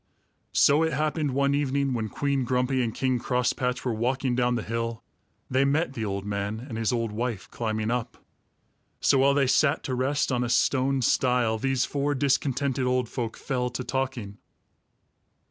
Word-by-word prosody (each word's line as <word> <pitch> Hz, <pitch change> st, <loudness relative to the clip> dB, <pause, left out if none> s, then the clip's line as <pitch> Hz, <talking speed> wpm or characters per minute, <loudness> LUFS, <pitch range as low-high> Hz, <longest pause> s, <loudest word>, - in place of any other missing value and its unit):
So 145 Hz, +2 st, +5 dB
it 160 Hz, 0 st, +1 dB
happened 155 Hz, 0 st, 0 dB
one 140 Hz, 0 st, +2 dB
evening, 140 Hz, -1 st, 0 dB
when 110 Hz, -3 st, -2 dB
Queen 140 Hz, +1 st, -1 dB
Grumpy 125 Hz, +1 st, +1 dB
and 115 Hz, -2 st, 0 dB
King 130 Hz, +1 st, 0 dB
Crosspatch 125 Hz, +1 st, -1 dB
were 125 Hz, -, 0 dB
walking 125 Hz, +3 st, 0 dB
down 125 Hz, 0 st, +2 dB
the 115 Hz, -, -2 dB
hill, 115 Hz, 0 st, -3 dB, 0.4 s
they 130 Hz, +1 st, +2 dB
met 145 Hz, +1 st, +1 dB
the 115 Hz, -, -4 dB
old 100 Hz, -1 st, -3 dB
man 100 Hz, +1 st, -3 dB
and 125 Hz, -1 st, -8 dB
his 115 Hz, +1 st, 0 dB
old 115 Hz, -3 st, -1 dB
wife 115 Hz, -2 st, -3 dB
climbing 110 Hz, -1 st, -2 dB
up. 125 Hz, 0 st, -3 dB, 0.8 s
So 135 Hz, -, +3 dB
while 140 Hz, +1 st, +4 dB
they 140 Hz, -1 st, +3 dB
sat 140 Hz, +3 st, +2 dB
to 130 Hz, -, -3 dB
rest 135 Hz, +3 st, 0 dB
on 125 Hz, -1 st, +1 dB
a 120 Hz, -, -2 dB
stone 135 Hz, +1 st, +2 dB
stile, 120 Hz, -3 st, +2 dB
these 135 Hz, +1 st, +1 dB
four 145 Hz, 0 st, -1 dB
discontented 135 Hz, -1 st, 0 dB
old 125 Hz, -2 st, 0 dB
folk 115 Hz, -4 st, -4 dB
fell 125 Hz, -3 st, -2 dB
to 125 Hz, +1 st, -5 dB
talking. 125 Hz, -5 st, -3 dB
125 Hz, 175 wpm, -26 LUFS, 115-135 Hz, 0.8 s, So